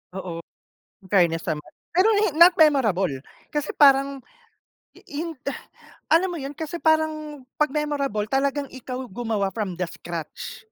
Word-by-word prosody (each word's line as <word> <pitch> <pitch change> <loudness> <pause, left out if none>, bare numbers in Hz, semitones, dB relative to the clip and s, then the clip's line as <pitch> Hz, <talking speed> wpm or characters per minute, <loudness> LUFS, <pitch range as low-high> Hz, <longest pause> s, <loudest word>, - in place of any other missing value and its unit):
Oo, 170 -3 -5 0.6
infairness 175 -4 +2
naman. 150 -1 -4 0.2
Pero 370 +5 +4 0.2
hin 360 - +1
not 350 +1 +9
memorable 210 - +3 0.3
kasi 295 0 -1
parang 275 -2 +4 0.7
i - - -16
hin 320 +1 -5
eh, 275 - -1 0.6
alam 340 +4 +5
mo 350 - -4
yun 275 +1 -5
kasi 315 +3 -6
parang 310 -3 0
'pag 300 -2 +1
memorable 280 -8 -1
talagang 275 +2 0
ikaw 255 0 -7
gumawa 215 -2 -2
from 190 -5 -3
the 180 - -1
scratch. 170 -2 -7
275 Hz, 140 wpm, -24 LUFS, 200-300 Hz, 0.7 s, not